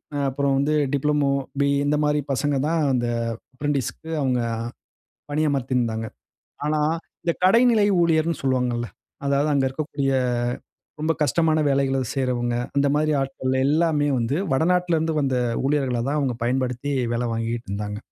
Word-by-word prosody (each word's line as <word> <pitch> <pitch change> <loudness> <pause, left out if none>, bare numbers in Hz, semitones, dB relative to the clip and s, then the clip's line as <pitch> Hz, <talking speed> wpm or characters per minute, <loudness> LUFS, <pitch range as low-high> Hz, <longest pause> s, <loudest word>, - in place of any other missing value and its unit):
அ - - -1
அப்புறம் 140 0 0
வந்து 145 +2 +1 0.2
diploma, 145 0 +2 0.3
BE 140 0 +3
இந்தமாரி 150 0 +1
பசங்க 145 +2 0
தான் 165 0 +1
அந்த 120 -1 0 0.5
அப்ரென்டிஸ் 145 -1 -1
க்கு 160 - -12
அவுங்க 125 -2 +1 0.9
பணியமர்த்தியிருந்தாங்க. 130 -7 0 0.6
ஆனா, 150 0 +1 0.4
இந்த 170 - +1
கடைநிலை 225 +1 +5
ஊழியர்ன்னு 165 -1 +1
சொல்வாங்கல்ல. 125 -3 0 0.4
அதாவது 140 +2 +2
அங்க 135 -1 +2
இருக்கக்கூடிய 140 -1 -2 0.9
ரொம்ப 160 +1 +2
கஷ்டமான 160 +1 +2
வேலைகள 135 -1 +1 0.2
செய்றவங்க 125 -3 0 0.2
அந்தமாரி 145 +2 +2
ஆட்கள் 130 -1 -2
எல்லாமே 150 -1 +2
வந்து 120 +5 0 0.2
வட 135 +4 +2
நாட்டுல 180 -2 +1
இருந்து 160 0 -1
வந்த 135 -2 0 0.3
ஊழியர்கள 135 -5 +1
தான் 150 +1 0
அவுங்க 130 -5 -1
பயன்படுத்தி 130 +2 -1 0.2
வேலை 120 +1 -1
வாங்கிட்டு 115 0 -3
இருந்தாங்க. 105 +1 -4
140 Hz, 135 wpm, -23 LUFS, 125-150 Hz, 0.9 s, கடைநிலை